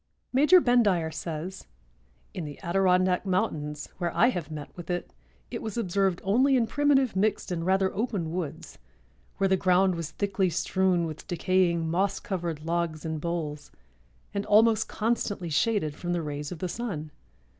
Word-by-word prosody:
Major 300 Hz, +8 st, +7 dB
Bendire 205 Hz, -, +2 dB
says: 170 Hz, +3 st, -5 dB, 0.7 s
"In 180 Hz, -, -4 dB
the 145 Hz, -2 st, -8 dB
Adirondack 185 Hz, 0 st, +2 dB
mountains, 155 Hz, -7 st, -1 dB
where 175 Hz, -2 st, -1 dB
I 240 Hz, -, +6 dB
have 175 Hz, -, -3 dB
met 150 Hz, -2 st, -8 dB
with 175 Hz, -1 st, -9 dB
it, 175 Hz, 0 st, -3 dB, 0.4 s
it -, -, -4 dB
was 220 Hz, -2 st, -5 dB
observed 195 Hz, -3 st, 0 dB
only 255 Hz, +8 st, +3 dB
in 240 Hz, -3 st, +3 dB
primitive 275 Hz, -2 st, +2 dB
mixed 200 Hz, 0 st, 0 dB
and 165 Hz, -2 st, -2 dB
rather 190 Hz, +1 st, +2 dB
open 200 Hz, -7 st, -2 dB
woods, 170 Hz, -4 st, -5 dB, 0.6 s
where 195 Hz, -, +2 dB
the 190 Hz, 0 st, +3 dB
ground 185 Hz, 0 st, +3 dB
was 165 Hz, -3 st, -4 dB
thickly 195 Hz, -1 st, 0 dB
strewn 180 Hz, 0 st, +1 dB
with 155 Hz, -1 st, -7 dB
decaying, 175 Hz, -2 st, +1 dB
moss 190 Hz, +4 st, 0 dB
covered 170 Hz, -5 st, -4 dB
logs 165 Hz, -1 st, -2 dB
and 160 Hz, -1 st, -3 dB
boles, 155 Hz, -3 st, -4 dB, 0.6 s
and 200 Hz, -, -1 dB
almost 220 Hz, +1 st, +4 dB
constantly 210 Hz, -5 st, -1 dB
shaded 155 Hz, 0 st, +1 dB
from 175 Hz, +4 st, -4 dB
the 170 Hz, -2 st, -1 dB
rays 145 Hz, -1 st, -5 dB
of 180 Hz, -, -5 dB
the 185 Hz, -, -3 dB
sun. 170 Hz, -8 st, -4 dB
180 Hz, 160 wpm, -27 LUFS, 165-200 Hz, 0.7 s, Major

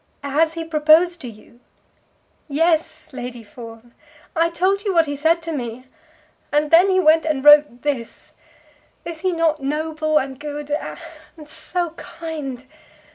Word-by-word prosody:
"Has 310 Hz, +3 st, +1 dB
he 330 Hz, 0 st, -4 dB
proposed 325 Hz, +2 st, +3 dB
to 255 Hz, -, -7 dB
you?" 230 Hz, +1 st, -14 dB, 0.9 s
"Yes, 320 Hz, 0 st, 0 dB
Lady 245 Hz, -2 st, -7 dB
Fawn. 230 Hz, +1 st, -12 dB, 0.4 s
I 335 Hz, +1 st, +2 dB
told 375 Hz, +4 st, 0 dB
you 395 Hz, -3 st, -1 dB
what 330 Hz, -1 st, +5 dB
he 290 Hz, -1 st, -4 dB
said 325 Hz, +4 st, +1 dB
to 330 Hz, -, -4 dB
me. 250 Hz, -3 st, -5 dB, 0.7 s
And 295 Hz, 0 st, +1 dB
then 350 Hz, +4 st, +6 dB
he 375 Hz, 0 st, +3 dB
went 320 Hz, -2 st, +4 dB
and 300 Hz, -4 st, -1 dB
wrote 295 Hz, -4 st, +6 dB
this. 270 Hz, -6 st, -4 dB, 0.7 s
Is 335 Hz, -2 st, -6 dB
he 370 Hz, 0 st, +1 dB
not 325 Hz, -3 st, 0 dB
noble 310 Hz, +2 st, -1 dB
and 265 Hz, -2 st, -2 dB
good, 295 Hz, 0 st, -6 dB
and 305 Hz, +1 st, -7 dB
so 345 Hz, +2 st, -3 dB
kind? 300 Hz, -6 st, -7 dB
305 Hz, 145 wpm, -21 LUFS, 275-330 Hz, 0.9 s, then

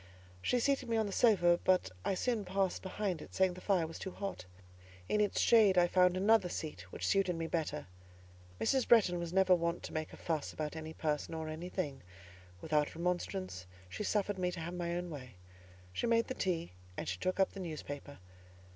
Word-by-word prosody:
She 245 Hz, -, +1 dB
seated 270 Hz, -1 st, +1 dB
me 230 Hz, -, +2 dB
on 220 Hz, -, +2 dB
the 200 Hz, -, -4 dB
sofa, 175 Hz, -7 st, +4 dB
but 185 Hz, -, +3 dB
I 195 Hz, -, 0 dB
soon 230 Hz, +1 st, 0 dB
passed 190 Hz, 0 st, 0 dB
behind 190 Hz, -3 st, -2 dB
it, -, -, -11 dB
saying 190 Hz, -1 st, +3 dB
the 185 Hz, -, -10 dB
fire 185 Hz, -5 st, +2 dB
was 160 Hz, -, -8 dB
too -, -, -4 dB
hot; 195 Hz, -, -5 dB, 0.6 s
in 210 Hz, -, +2 dB
its 205 Hz, -, +1 dB
shade 210 Hz, -5 st, +5 dB
I 175 Hz, -, +7 dB
found 180 Hz, +1 st, +3 dB
another 200 Hz, -1 st, +4 dB
seat 95 Hz, -, -6 dB
which -, -, -4 dB
suited 195 Hz, -3 st, +2 dB
me 165 Hz, 0 st, -3 dB
better. 160 Hz, -2 st, -2 dB, 0.7 s
Mrs. 265 Hz, -2 st, +2 dB
Bretton 195 Hz, -7 st, +5 dB
was 170 Hz, -1 st, -4 dB
never 190 Hz, 0 st, +5 dB
wont 170 Hz, -1 st, 0 dB
to -, -, -7 dB
make 155 Hz, 0 st, -3 dB
a -, -, -11 dB
fuss 160 Hz, -3 st, -2 dB
about 155 Hz, 0 st, -4 dB
any 160 Hz, 0 st, -6 dB
person 150 Hz, +1 st, -2 dB
or 160 Hz, -1 st, -4 dB
anything; 160 Hz, -3 st, -4 dB, 0.6 s
without 150 Hz, -1 st, 0 dB
remonstrance 180 Hz, -, -2 dB, 0.2 s
she -, -, -6 dB
suffered 205 Hz, -1 st, 0 dB
me 180 Hz, -1 st, +1 dB
to 175 Hz, -, -6 dB
have 170 Hz, +2 st, -5 dB
my 175 Hz, -1 st, -2 dB
own 175 Hz, 0 st, -3 dB
way. 130 Hz, -7 st, -8 dB, 0.6 s
She 240 Hz, -, -1 dB
made 230 Hz, 0 st, +3 dB
the -, -, -4 dB
tea, 175 Hz, -7 st, -1 dB, 0.3 s
and -, -, -4 dB
she 90 Hz, -1 st, -3 dB
took 185 Hz, +1 st, -1 dB
up 190 Hz, -, +3 dB
the 195 Hz, -, -9 dB
newspaper. 145 Hz, -4 st, -6 dB
180 Hz, 200 wpm, -34 LUFS, 160-195 Hz, 0.7 s, I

